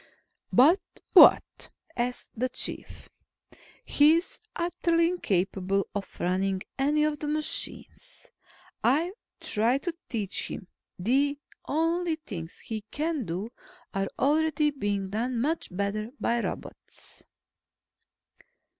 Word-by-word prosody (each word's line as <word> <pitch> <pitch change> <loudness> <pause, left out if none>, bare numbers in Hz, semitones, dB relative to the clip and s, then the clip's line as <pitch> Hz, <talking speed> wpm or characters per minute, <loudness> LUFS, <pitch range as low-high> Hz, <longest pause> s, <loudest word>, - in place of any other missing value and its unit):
"But 310 +10 +6 0.3
what?" - - +7 0.3
asked 245 +1 -3
the 255 +3 -1
Chief. 255 - -6 0.8
"He's 320 +5 +3 0.2
utterly 335 -1 +1
incapable 195 - 0
of 205 -2 -6
running 190 +1 0 0.2
any 295 +2 +3
of 300 -1 0
the 300 - -4
machines. 310 +10 -3 0.5
I've 315 +9 +2 0.3
tried 235 +6 +1
to 345 -2 -2
teach 210 -5 -2
him. 185 - -7 0.3
The 275 +9 +2 0.3
only 330 +2 +1
things 180 - -8
he 220 -1 -5
can 305 -4 -2
do, 185 +7 -4 0.4
are 195 0 0
already 300 +1 +2
being 205 -7 -2
done 235 +3 -1
much 310 +7 -1
better 200 +3 -2
by 235 0 +1
robots." - - -8
255 Hz, 105 wpm, -28 LUFS, 200-310 Hz, 0.8 s, what